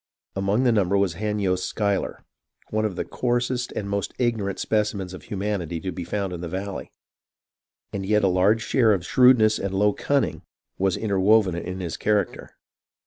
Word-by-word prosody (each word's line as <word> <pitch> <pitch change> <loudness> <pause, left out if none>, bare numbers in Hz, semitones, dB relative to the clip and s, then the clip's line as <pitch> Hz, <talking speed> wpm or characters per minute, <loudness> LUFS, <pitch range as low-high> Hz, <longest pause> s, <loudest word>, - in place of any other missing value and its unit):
Among 100 +5 +1
the 125 - +4
num 100 -5 +2
ber 100 - +3
was 100 -3 +1
Hanyost 100 -1 -1
Schuyler, 100 -2 -2 0.5
one 110 0 0
of 100 -4 -2
the - - -3
coarsest 125 0 -1
and 100 - -4
most 100 -1 -3
ignorant 110 -6 -1
specimens 105 -4 -1
of 95 - -8
humanity 95 -5 -3
to 95 +2 -4
be 90 +1 -5
found 100 +1 -3
in 85 - -6
the 90 - -4
valley; 95 +2 -5 1.0
and 100 - -3
yet 105 +2 +2
a - - +5
large 95 +5 +3
share 115 -3 +3
of 90 -3 -2
shrewdness 120 -3 +5
and 95 -1 -3
low 105 +1 +3
cunning 135 - 0 0.4
[was] 95 -1 +1
interwoven 100 -1 +3
in 90 +2 -5
his 85 -2 -4
character. 105 -3 -1
100 Hz, 175 wpm, -24 LUFS, 95-110 Hz, 1.0 s, a